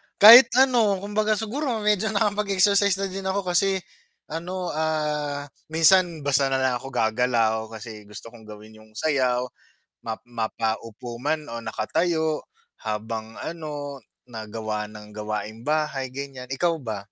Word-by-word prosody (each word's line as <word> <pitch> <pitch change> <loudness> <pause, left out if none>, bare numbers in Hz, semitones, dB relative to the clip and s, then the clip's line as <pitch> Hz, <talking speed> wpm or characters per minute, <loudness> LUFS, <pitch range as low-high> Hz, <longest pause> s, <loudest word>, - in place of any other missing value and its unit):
kahit 230 +4 +11
ano 240 -6 +4
kumbaga 215 +1 +1
siguro 230 0 -2
medyo 210 0 +2
nakapag-exercise 200 -2 +2
na 195 - -1
din 195 +1 -5
ako 195 0 -1
kasi 195 +1 +3 0.5
ano, 180 +3 -5
ah, 150 -2 -1 0.2
minsan 165 -1 +4
basta 140 -1 +3
na 135 - +1
lang 130 -1 +1
ako 135 - -8
gagalaw 110 -2 +1
kasi 110 -1 -9
gusto 105 - -9
kong 115 -2 -14
gawin 110 +1 -12
yung 110 - -19
sayaw 125 -4 +1 0.6
ma 110 - -2
mapaupo 115 0 -4
man 150 +2 -2
o 115 - -5
nakatayo 155 +8 -1 0.3
habang 110 0 -5
ano 145 -4 -6 0.3
nagawa 110 -1 -4
ng 105 0 -12
gawaing 105 +1 -4
bahay 150 -3 0
ganyan, 135 -2 -7
ikaw 165 +4 0
ba? 110 -7 -5
145 Hz, 135 wpm, -24 LUFS, 110-185 Hz, 0.6 s, kahit